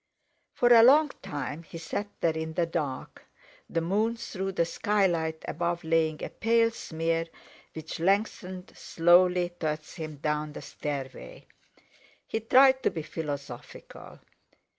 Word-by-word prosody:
For 240 - +3
a 230 - +9
long 290 +6 +6
time 145 +1 -5
he 170 - -10
sat 175 +5 -4
there 165 -1 +2
in 160 0 -4
the 170 - +2
dark, 150 -6 -4 0.5
the 165 - -1
moon 210 +7 0
through 195 -4 -4
the 170 - +1
skylight 170 -5 0
above 170 +2 -2
laying 160 -1 +1
a - - -3
pale 230 0 +2
smear 165 -5 -2 0.5
which 160 0 -7
lengthened 190 0 -1
slowly 175 +1 +3
towards 155 -1 -3
him 155 -2 -6
down 150 +1 -2
the - - -8
stairway. 145 - -6 0.8
He 220 - -2
tried 260 +4 +5
to - - +2
be 160 - -5
philosophical. 145 -5 -7
165 Hz, 135 wpm, -28 LUFS, 155-200 Hz, 0.8 s, a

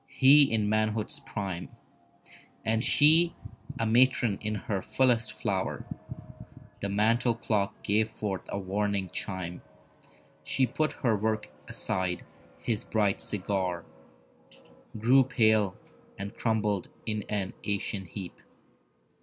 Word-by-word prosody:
He 140 0 +6
in 110 -2 +2
manhood's 110 0 0
prime 95 -4 -5 1.0
And 110 +1 +2
she 160 +5 +5 0.4
a 115 - 0
matron 120 -2 +3
in 105 0 -1
her 100 -1 -3
fullest 120 -2 +2
flower. 95 -4 -2 1.0
The 100 - -2
mantel 115 +4 +2
clock 105 -3 -1
gave 110 +2 +2
forth 100 -3 -4
a - - -3
warning 100 -1 -1
chime. 90 -2 -4 0.8
She 130 - +1
put 155 +6 -1
her 115 -3 +4
work 110 +1 -1 0.2
aside; 90 -1 -2 0.3
his 110 -3 -2
bright 105 -3 +1
cigar 95 -3 -2 1.1
Grew 125 +5 +5
pale, 110 -6 +2 0.4
and 100 +2 -6
crumbled 105 -4 0 0.2
in 105 -1 -1
an 100 -3 -1
ashen 100 -1 -2
heap. 90 0 -8
105 Hz, 110 wpm, -29 LUFS, 100-115 Hz, 1.1 s, He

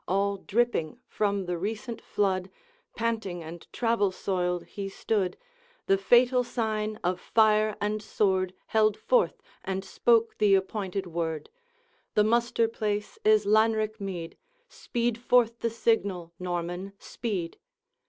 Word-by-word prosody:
All 200 +1 +1
dripping 235 -3 0
from 200 -2 -1
the 175 -1 -3
recent 220 +5 -4
flood, 190 -2 0 0.5
Panting 220 -7 -2
and 165 +1 -9
travel 230 -5 +1
soiled 180 -2 -1
he 195 -1 -6
stood, 195 -1 -1 0.5
The 195 - +4
fatal 245 +5 +4
sign 215 -3 -2
of 180 +1 0
fire 215 -1 +3
and 210 +1 -1
sword 190 -3 0
Held 215 -1 +2
forth, - - +1 0.2
and 190 0 -3
spoke 230 +3 +2
the 205 -2 +5
appointed 195 0 -2
word: 165 - -3 0.6
'The 210 - +5
muster 235 +1 +2
place 210 -2 -3
is 215 -1 +4
Lanrick 215 +1 +2
mead; 180 -4 -5 0.3
Speed 235 - -2
forth 240 -1 +3
the 230 - 0
signal! 200 -7 0
Norman, 175 +2 -3
speed!' 195 -7 -4
205 Hz, 125 wpm, -28 LUFS, 185-225 Hz, 0.6 s, the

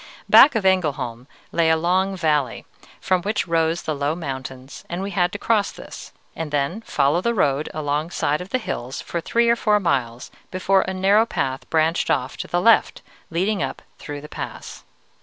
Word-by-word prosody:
Back 285 - +8
of 220 - 0
Engelholm 140 -10 0 0.2
lay 165 -1 +2
a 160 - +4
long 185 +3 +1
valley, 150 -7 0 0.3
from 185 -1 +1
which 205 -1 -1
rose 165 0 +1
the 155 - -2
low 145 +2 -1
mountains, 130 -4 -7
and 175 +2 -3
we 200 - -4
had 175 -1 +1
to - - -3
cross 210 -1 +1
this, - - -10 0.2
and 165 -2 -4
then 145 +8 -1
follow 145 -4 +1
the 235 +4 0
road 145 -5 +1
along 150 0 -2
the - - -13
side 150 +3 0
of 180 - -8
the 255 - +1
hills 130 - -5
for 170 - -4
three 235 +7 +1
or 235 - +5
four 210 -2 +2
miles, 125 - -2 0.2
before 190 +1 +2
a - - -1
narrow 200 +4 +3
path 130 -8 -3
branched 160 +1 +1
off 130 +2 0
to - - -5
the 175 - 0
left, 225 +5 +3 0.3
leading 190 +4 0
up - - -4 0.2
through 145 -1 -7
the 150 - -10
pass. - - -8
165 Hz, 195 wpm, -22 LUFS, 145-190 Hz, 0.3 s, Back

